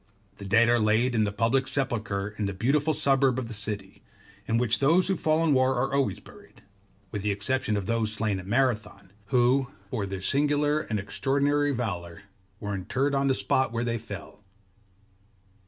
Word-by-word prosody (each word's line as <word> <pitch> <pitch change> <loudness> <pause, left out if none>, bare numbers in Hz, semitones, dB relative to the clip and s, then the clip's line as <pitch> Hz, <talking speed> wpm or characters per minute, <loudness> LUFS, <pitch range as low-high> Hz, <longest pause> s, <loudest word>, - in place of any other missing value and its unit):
The 100 - -8
dead 115 +4 +4
are 120 0 +3
laid 110 +4 +2
in 110 -2 +2
the 100 - -2
public 115 +6 +1
sepulchre 110 -7 -1
in 105 - 0
the 100 - -4
Beautiful 145 +9 +1
suburb 135 -3 +3
of 130 -3 -3
the - - -5
city, 100 -2 -5 0.5
in 115 - +1
which 120 -1 +1
those 165 +7 +4
who 190 - +1
fall 155 -1 +1
in 160 -3 +3
war 130 0 +3
are 135 +2 -1
always 140 -1 0
buried; - - -17 0.5
with 105 - -4
the 105 - -1
exception 105 +2 0
of 100 - -3
those 115 0 0
slain 105 -2 -1
at 95 - -10
Marathon, 105 -5 -1 0.2
who 125 +3 +3 0.2
for 110 -6 -2
their 95 -1 -5
singular 145 +7 +1
and 110 -8 -3
extraordinary 140 +9 0
valour 100 -7 -4 0.4
were 100 -1 -4
interred 130 +9 -1
on 140 0 +1
the 135 - +2
spot 130 -1 +1
where 115 0 -2
they 120 -1 -1
fell. 100 -2 -9
115 Hz, 185 wpm, -27 LUFS, 100-135 Hz, 0.5 s, dead